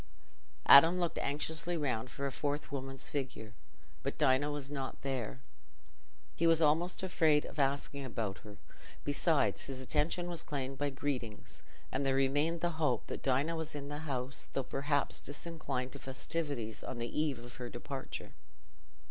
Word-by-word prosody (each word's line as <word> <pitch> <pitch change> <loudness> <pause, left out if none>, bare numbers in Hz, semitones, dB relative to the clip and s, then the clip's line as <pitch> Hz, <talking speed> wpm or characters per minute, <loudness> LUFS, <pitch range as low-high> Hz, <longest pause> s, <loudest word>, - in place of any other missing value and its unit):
Adam 165 +6 +9
looked 170 -2 0
anxiously 160 +4 -1
round 125 -6 -1
for 140 +2 -4
a 140 - -1
fourth 145 +2 -2
woman's 135 -1 -4
figure, 125 -5 -3 0.5
but - - -3
Dinah 145 0 +4
was 145 -1 -4
not 135 -2 -4
there. 130 -2 -2 0.9
He 170 - +3
was 165 -1 +6
almost 165 +4 +3
afraid 160 -5 +3
of - - -7
asking 140 0 +1
about 115 -6 -3
her; 105 -1 -11 0.5
besides, 145 +1 +2
his 135 -1 -4
attention 155 +6 +1
was 175 -2 -1
claimed 135 -2 -4
by 145 0 +1
greetings, 130 -6 -4 0.3
and 135 - 0
there 135 -1 +2
remained 145 +5 +2
the 170 -2 -1
hope 150 - +2
that - - -5
Dinah 140 +5 +2
was 160 -2 -4
in 140 -1 -5
the 145 0 -4
house, 135 -3 -3
though 135 - 0
perhaps 140 +2 0
disinclined 145 -4 -4
to - - -7
festivities 135 -4 -3
on 125 - -5
the 120 +5 -1
eve 150 -5 0
of 120 +1 -10
her 125 -1 -5
departure. 135 +3 -6
140 Hz, 160 wpm, -34 LUFS, 130-155 Hz, 0.9 s, Adam